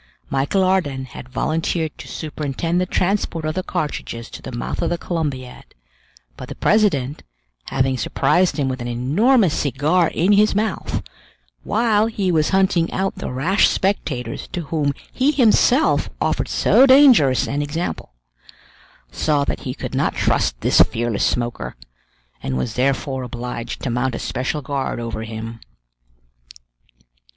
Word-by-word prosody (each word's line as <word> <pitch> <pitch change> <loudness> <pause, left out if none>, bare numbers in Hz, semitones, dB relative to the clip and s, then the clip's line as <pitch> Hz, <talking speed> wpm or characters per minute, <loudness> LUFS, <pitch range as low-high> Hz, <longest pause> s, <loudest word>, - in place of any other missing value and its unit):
Michel 140 +8 +1
Ardan 150 -9 0
had 125 0 -11
volunteered 160 +3 -1
to - - -9
superintend 155 +3 -2
the 180 - -1
transport 180 -4 -1
of 155 - -1
the 185 - -2
cartridges 150 -10 -4
to - - -9
the 130 - -8
mouth 120 - -4
of 170 - 0
the 175 - -1
Columbiad; 145 -8 -5 0.6
but - - -9
the - - -6
president, 155 -11 +1 0.4
having 130 -1 0
surprised 175 +11 +1
him 140 -3 0
with 130 -1 -3
an 120 - -4
enormous 165 - +2
cigar 150 +6 +1
in 180 +6 +1
his 210 0 +4
mouth, 215 0 -2 0.6
while 220 -1 +2
he 200 -5 -1
was 155 -2 +2
hunting 190 -3 +2
out 190 +1 -2
the - - -5
rash 170 +11 +3
spectators 135 - -2
to 175 - -4
whom 150 -1 0 0.2
he 265 +3 +2
himself 255 +1 +3
offered - - 0
so 270 - +4
dangerous 260 - +6
an 145 +1 -1
example, 145 - -4 1.0
saw 150 -2 +1
that - - -2
he - - -4
could - - -6
not - - 0
trust - - +1
this - - +4
fearless 115 -2 +1
smoker, 120 -1 -2 0.7
and 65 -1 -2
was 65 - -2
therefore 130 +1 0
obliged 120 -1 -6
to 130 - -1
mount 125 +1 -1
a - - -3
special 130 +4 -3
guard 135 -2 -3
over 115 -1 -4
him. 115 +1 -7
150 Hz, 145 wpm, -20 LUFS, 130-185 Hz, 1.0 s, dangerous